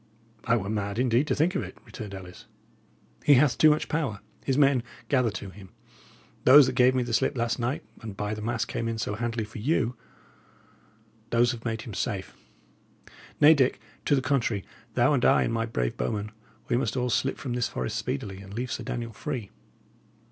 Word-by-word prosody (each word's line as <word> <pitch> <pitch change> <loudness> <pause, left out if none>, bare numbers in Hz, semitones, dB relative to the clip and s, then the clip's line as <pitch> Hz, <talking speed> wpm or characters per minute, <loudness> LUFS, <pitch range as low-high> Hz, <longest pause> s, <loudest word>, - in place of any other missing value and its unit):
"I 115 +1 +3
were 100 -3 -4
mad, 100 -1 -2
indeed, 125 +3 +2
to - - +1
think 165 +5 +2
of 185 - -1
it," - - -8
returned 105 -5 -8
Ellis. 90 -1 -11 0.8
"He 145 - +7
hath 130 -2 +4
too 155 - +6
much 150 0 +1
power; 140 -10 -2 0.2
his 135 -1 0
men 140 -3 +4 0.3
gather 125 -4 +3
to 100 -2 -7
him; 95 -1 -13 0.7
those 140 +2 +9
that 130 - -1
gave 125 0 +4
me 125 - +2
the 120 -1 -4
slip 130 - +1
last 115 +1 0
night, 120 +3 -2 0.2
and 110 -3 -8
by 105 +1 -2
the 110 - -5
mass 115 +1 -1
came 115 - -3
in 115 0 -2
so 110 - -2
handily 115 0 -2
for 110 +1 -9
you 125 -1 +1 1.3
those 120 +1 +3
have 120 -1 -8
made 110 -2 -2
him 115 - -8
safe. 95 0 -3 1.0
Nay, 150 +2 +8
Dick, 135 -4 +2 0.3
to 145 - +4
the 130 - 0
contrary, 125 -8 0 0.3
thou 120 +5 +4
and 130 - +1
I - - +5
and 115 - -1
my 115 0 0
brave - - -2
bowmen, 105 +12 -2 0.4
we 120 - +1
must 135 +1 -1
all 125 -1 0
slip 135 +4 0
from 125 - -4
this 120 -1 0
forest 65 - -3
speedily, 95 +6 -3
and 100 +1 -10
leave 125 +2 -3
Sir - - -3
Daniel 115 -1 -4
free." 125 -3 -5
120 Hz, 200 wpm, -27 LUFS, 105-130 Hz, 1.3 s, those